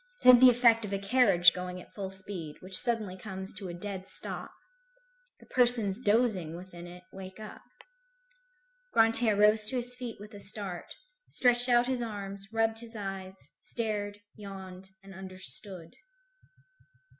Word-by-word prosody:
It - - +1
had 250 -1 +9
the 255 - +10
effect 235 -2 +4
of 205 - -4
a - - +1
carriage 195 -4 +5
going 180 0 -6
at 185 - -15
full 195 0 -5
speed, 190 -5 -7
which 185 +1 -5
suddenly 225 -6 -2
comes 190 0 -8
to 195 - -7
a - - -6
dead 190 +1 -6
stop. - - -7 0.9
The - - -17
persons 240 -5 +1
dozing 205 -8 +1
within 175 -1 -10
it 180 +1 -12
wake 190 +1 -10
up. 215 -1 -10 1.3
Grantaire 225 -1 +5
rose 210 +1 +4
to 260 - -2
his 245 0 +1
feet 245 -2 -7
with 210 +2 -12
a 205 - -9
start, 200 -2 -4 0.4
stretched 245 0 +2
out 240 0 +5
his 255 -1 -1
arms, 200 -3 -6
rubbed 225 0 +1
his 230 0 -6
eyes, 195 -2 -7
stared, 210 -3 -4 0.2
yawned, 190 -2 -10
and 195 0 -12
understood. 185 -2 -6
205 Hz, 155 wpm, -30 LUFS, 190-230 Hz, 1.3 s, the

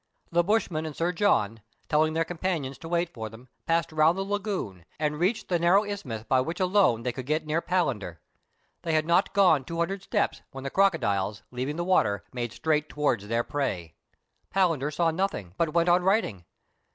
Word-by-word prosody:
The 175 0 +3
bushman 170 -6 0
and 150 - -7
Sir 170 +2 0
John, 115 - +1 0.3
telling 155 +1 +2
their 165 +1 +1
companions 165 -6 -3
to 165 - -8
wait 175 0 0
for 110 -2 -5
them, 120 +4 -14 0.2
passed 165 0 +1
round 155 +3 +3
the 195 - -1
lagoon, 195 - -3
and 150 -1 -1
reached 190 +6 0
the 175 -2 +1
narrow 185 +5 +4
isthmus 130 - -5
by 130 +2 +2
which 165 +6 -4
alone 185 - +3
they 125 - 0
could 125 +1 -7
get 155 +1 0
near 155 +2 0
Palander. 135 - -1 0.6
They 165 - -2
had 155 0 +2
not 175 +5 +2
gone 180 -8 +5
two 165 +6 -6
hundred 190 +3 -1
steps, - - -1
when 135 0 -9
the 135 - -4
crocodiles, 105 - +1
leaving 130 +4 -3
the 175 - -2
water, 100 - +2
made 120 -2 -3
straight 150 +2 0
towards 120 -9 0
their 115 +2 0
prey. 95 - -3 0.6
Palan 180 -6 +2
der 140 +3 -2
saw 165 +2 +1
nothing, 160 - -2
but 165 +5 0
went 170 0 +3
on 175 +1 +5
writing. 180 - 0
160 Hz, 195 wpm, -27 LUFS, 125-180 Hz, 0.6 s, gone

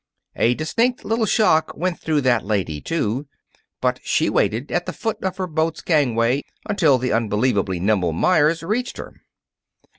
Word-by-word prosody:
A 120 +2 +2
distinct 235 - -1
little 225 0 0
shock 160 -8 +3
went 180 +1 -2
through 155 -2 0
that 125 -3 +2
lady, 95 -8 -2
too. 140 -3 -2 0.5
But - - 0
she - - +1
waited 120 +7 0
at 175 0 -1
the - - -3
foot 225 -2 -4
of 190 -1 -2
her 190 - -2
boat's 160 -1 -1
gangway 130 -5 +2 0.3
until 160 -10 +3
the 125 -1 -1
unbelievably 105 -4 0
nimble 95 -4 +1
Meyers 160 - +2
reached 220 +8 -2
her. - - -8
145 Hz, 155 wpm, -21 LUFS, 115-175 Hz, 0.5 s, shock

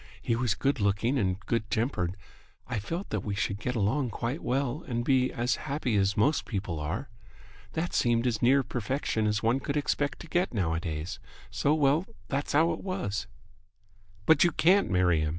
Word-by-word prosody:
He 115 - 0
was 115 -3 +1
good 135 +4 0
looking 105 +6 +1
and 95 -3 0
good 110 +2 -2
tempered. 105 -7 -1 0.5
I 125 -4 -2
felt 170 - -5
that - - 0
we 105 -2 -3
should 100 0 -1
get 125 +3 -2
along 120 +5 +1
quite 120 +7 -3
well 135 +3 -1
and 120 -2 -2
be 130 -1 +3
as 120 +1 0
happy 135 -5 0
as 100 0 +2
most 140 +9 +2
people 95 -6 -3
are. 90 - -4 0.6
That 165 +2 -2
seemed 120 0 +2
as 120 -3 0
near 135 +3 +5
perfection 120 -2 -1
as 105 -1 0
one 115 +4 +3
could 140 +1 -2
expect 145 0 0
to 170 - -9
get 175 -3 0
nowadays, 80 0 -2 0.3
so 145 +2 +2
well, 150 +4 +2 0.2
that's 140 +1 -2
how 160 +3 +4
it - - -6
was." 105 - -3 1.0
"But 160 - +6
you 175 - +5
can't 190 +6 +4
marry 90 -3 +3
him! 80 0 0
120 Hz, 185 wpm, -29 LUFS, 100-140 Hz, 1.0 s, But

